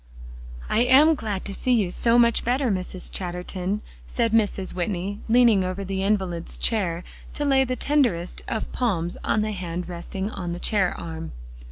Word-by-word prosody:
"I - - +1
am 265 +6 +6
glad 215 -9 -3
to 200 - -3
see 250 +5 0
you 205 -7 +2
so 230 +5 +3
much 235 -1 +4
better, 250 0 +1
Mrs. 185 -1 -3
Chatterton," 180 +2 -3 0.2
said 225 - 0
Mrs. 205 -4 +1
Whitney, 185 +2 -2
leaning 230 -4 +5
over 185 +2 -3
the 190 0 -2
invalid's 190 -4 -1
chair 180 -6 0 0.3
to 295 - -1
lay 270 -1 +4
the 255 0 -2
tenderest 240 - 0
of 220 - -3
palms 175 -9 -1
on 215 - +1
the 215 - -2
hand 180 -3 -4
resting 190 +3 -5
on 175 -4 -4
the 175 - -5
chair 195 -4 +1
arm. 160 -1 -6
195 Hz, 170 wpm, -24 LUFS, 180-230 Hz, 0.3 s, am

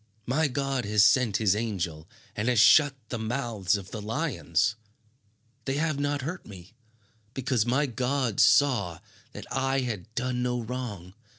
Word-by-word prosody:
My 145 +6 +1
God 135 -1 -2
has 105 0 +4
sent 120 -6 +3
his 105 -3 +2
angel 90 -7 -3 0.3
and 105 +3 -2
has 120 -3 +3
shut 145 +5 +6
the 125 - -4
mouths 110 -4 -1
of 95 -2 -10
the 110 - -6
lions. 110 - -1 0.9
They 135 - -1
have 155 -1 -1
not 145 -1 -1
hurt 170 +6 -5
me, 95 0 -13 0.6
because 125 -4 0
my 135 +5 +2
God 125 -2 -1
saw 115 - +4 0.4
that - - -8
I 135 0 0
had 110 -5 -5
done 125 0 -1
no 125 0 -1
wrong. 110 -7 -6
120 Hz, 155 wpm, -27 LUFS, 105-135 Hz, 0.9 s, shut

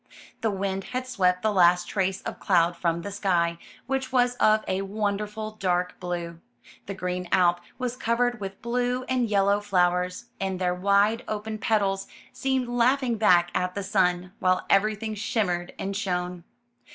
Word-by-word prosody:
The 225 - +1
wind 195 -1 -2
had 255 0 -1
swept 185 -7 +1
the 215 - +2
last 175 -1 +4
trace 190 -1 -1
of - - -6
cloud 175 -2 +3
from 170 -1 -1
the 200 - -5
sky, 175 -4 0 0.3
which 265 0 -2
was 245 -1 +3
of 215 0 +3
a 185 +1 0
wonderful 210 +1 -3
dark 180 -4 -1
blue. 175 -2 -4 0.5
The 200 - -4
green 180 -1 -3
Alp 175 -1 +3 0.2
was 250 -1 -3
covered 245 0 0
with 195 0 -7
blue 245 +1 0
and 255 -3 0
yellow 200 0 +3
flowers, 180 0 0
and 190 -1 -2
their 180 -1 0
wide 200 +5 +2
open 215 0 -4
petals 195 -3 0 0.3
seemed 265 -2 -1
laugh 245 +3 +2
ing 240 -3 0
back 175 -5 +4
at 180 0 -1
the 200 - -3
sun, 180 -2 +1
while 185 0 +1
everything 215 +2 +2
shimmered 195 -5 -1
and 195 +1 -4
shone. 180 -3 -3
195 Hz, 165 wpm, -26 LUFS, 180-220 Hz, 0.5 s, last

